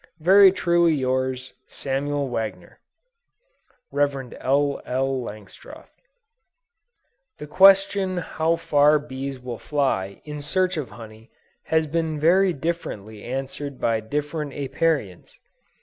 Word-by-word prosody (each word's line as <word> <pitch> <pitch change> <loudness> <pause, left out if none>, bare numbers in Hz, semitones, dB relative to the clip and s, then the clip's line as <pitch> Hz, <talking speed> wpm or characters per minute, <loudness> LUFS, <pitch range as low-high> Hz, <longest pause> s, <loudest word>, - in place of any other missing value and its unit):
Very 190 +4 +7
truly 170 -3 +2
yours, 130 -1 -2
SAMUEL 140 +1 -3
WAGNER. 110 -7 -5 1.1
REV. 140 -3 -1
L. 140 +1 +1
L. 130 +1 -1
LANGSTROTH. 105 -4 -11 1.5
The 150 - -8
question 195 +2 +4
how 165 -1 0
far 150 -2 +3
bees 135 -2 -6
will 125 -2 -7
fly 130 -10 -1
in 150 -1 -6
search 185 +5 0
of 150 -5 -4
honey, 110 -1 -13 0.4
has 160 0 +1
been 160 0 -2
very 185 +5 +4
differently 120 - -5
answered 135 +2 -5
by 115 -1 +1
different 150 +5 -4
Apiarians. 135 - -2
145 Hz, 105 wpm, -23 LUFS, 130-160 Hz, 1.5 s, Very